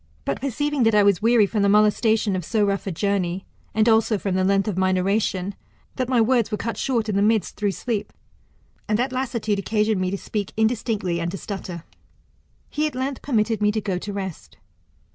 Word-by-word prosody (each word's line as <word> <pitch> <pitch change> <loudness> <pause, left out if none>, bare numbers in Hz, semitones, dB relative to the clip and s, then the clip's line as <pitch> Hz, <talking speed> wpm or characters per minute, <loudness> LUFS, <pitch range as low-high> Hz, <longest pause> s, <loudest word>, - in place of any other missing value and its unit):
But 140 - -2
perceiving 290 +2 -1
that 225 -2 +4
I 210 - +6
was 200 -4 +3
weary 230 -1 +5
from 210 +1 -1
the 200 - +3
molestation 210 0 +3
of 185 - -2
so 210 +5 +1
rough 200 0 -1
a - - -1
journey, 190 0 -1 0.3
and 220 +1 +3
also 225 -1 +3
from 195 -1 -2
the 185 0 +1
length 195 +2 +2
of 210 - -1
my 185 0 +2
narration, 190 0 0 0.4
that 255 -1 -2
my 255 -2 +3
words 235 0 +3
were 210 - -2
cut 230 +2 -3
short 235 -5 -1
in 210 - -1
the 200 - +2
midst 215 0 +1
through 205 -2 -1
sleep; 225 -2 -3 0.8
and 210 - +1
that 250 +3 0
lassitude 235 -5 -1
occasioned 210 0 0
me 185 - 0
to 200 - -2
speak 205 0 -4
indistinctly 220 -6 0
and 170 - -1
to 195 - -5
stutter, 180 -4 -6 0.9
he 305 +1 0
at 300 - -7
length 265 +1 -3
pernitted 225 -4 0
me 210 0 +3
to 220 - -1
go 195 -4 -2
to 205 - -6
rest. 190 -4 -6
210 Hz, 210 wpm, -23 LUFS, 195-225 Hz, 0.9 s, I